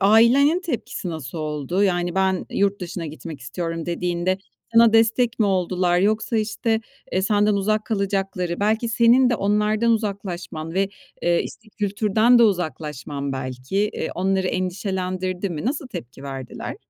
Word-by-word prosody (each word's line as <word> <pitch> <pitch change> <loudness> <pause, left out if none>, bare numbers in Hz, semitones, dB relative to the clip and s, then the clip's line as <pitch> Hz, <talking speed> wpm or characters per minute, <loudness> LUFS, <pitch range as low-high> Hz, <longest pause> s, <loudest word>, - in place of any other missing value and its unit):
ailenin 235 - +5
tepkisi 265 - -4
nasıl 160 -1 -6
oldu? 155 +4 -1
Yani, 175 -3 +1
"Ben, 190 -1 +1
yurt 200 0 +1
dışına 175 -1 -5
gitmek 155 -1 -8
istiyorum" 165 +4 -4
dediğinde 175 +1 -1 0.4
sana 230 -1 +7
destek 225 +1 +3
mi 215 - +3
oldular 180 -2 +1
yoksa, 215 +4 +1
işte, 220 +1 0 0.3
eee, 185 - +1
senden 205 +1 +3
uzak 215 +2 +1
kalacakları, 195 -4 -1
belki 220 +3 +1
senin 240 +3 +5
de - - +3
onlardan 210 +3 +2
uzaklaşman 185 -7 -3
ve, 195 +1 +2 0.3
eee, 170 0 +2
işte, 220 - -10
kültürden 215 +4 +3
de 235 - +6
uzaklaşman 150 - -1
belki, 130 +5 -5 0.2
eee, - - -3
onları 190 +1 +1
endişelendirdi 185 0 -2
mi? 155 +1 -4
Nasıl 280 +3 -2
tepki 125 - -8
verdiler? 135 -2 -6
190 Hz, 140 wpm, -23 LUFS, 175-215 Hz, 0.4 s, sana